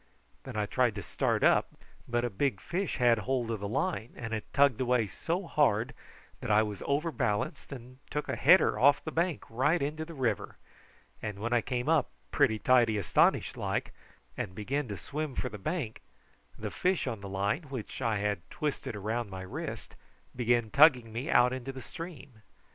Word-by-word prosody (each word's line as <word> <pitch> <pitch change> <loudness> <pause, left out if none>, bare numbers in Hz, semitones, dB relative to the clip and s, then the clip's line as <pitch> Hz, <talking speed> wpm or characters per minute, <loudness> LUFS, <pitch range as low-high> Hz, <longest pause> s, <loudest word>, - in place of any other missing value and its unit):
Then - - -7
I 105 -1 0
tried 120 0 +1
to 100 - -5
start - - 0
up, - - +3 0.3
but 120 0 0
a 120 - -2
big 135 +8 0
fish 180 +3 -2
had 120 -3 +4
hold 120 +1 -1
of 110 - -2
the 100 - -4
line, 135 - -2
and 115 -2 -5
it 110 - -5
tugged 140 -3 +4
away 125 -2 +2
so 170 - -3
hard 125 -7 +2 0.5
that - - -5
I 105 +1 +5
was 105 -2 -5
overbalanced, 140 -10 -1
and 130 -1 -10
took 150 +1 -3
a - - -1
header 180 +7 +5
off 145 +2 +5
the 155 - -3
bank 170 -2 0
right 135 +9 +2
into 150 +2 -2
the 165 +1 -9
river; 120 -7 -1 0.6
and 105 -2 -4
when 115 +4 -2
I 120 - +4
came 125 +2 -3
up, 155 -4 +3 0.2
pretty 110 - +3
tidy 120 -2 +4
astonished 100 - +2
like, - - -2 0.4
and 95 - -4
began 135 +7 -2
to 100 -2 -5
swim 145 - -4
for 125 - -2
the 105 -2 -8
bank, 125 - -3 0.6
the - - -5
fish 185 0 0
on 115 -6 -4
the 100 - -7
line, 100 - -1
which 130 -2 -6
I 115 -4 +1
had 100 -2 -1
twisted 150 -8 -3
round 110 +2 -2
my 95 -1 -6
wrist, 95 - -6 0.4
began 120 -2 +1
tugging 130 -7 +5
me 125 +6 -4
out 125 +1 +5
into 130 +1 -4
the 130 - -9
stream. 145 -9 -9
125 Hz, 185 wpm, -30 LUFS, 110-145 Hz, 0.6 s, I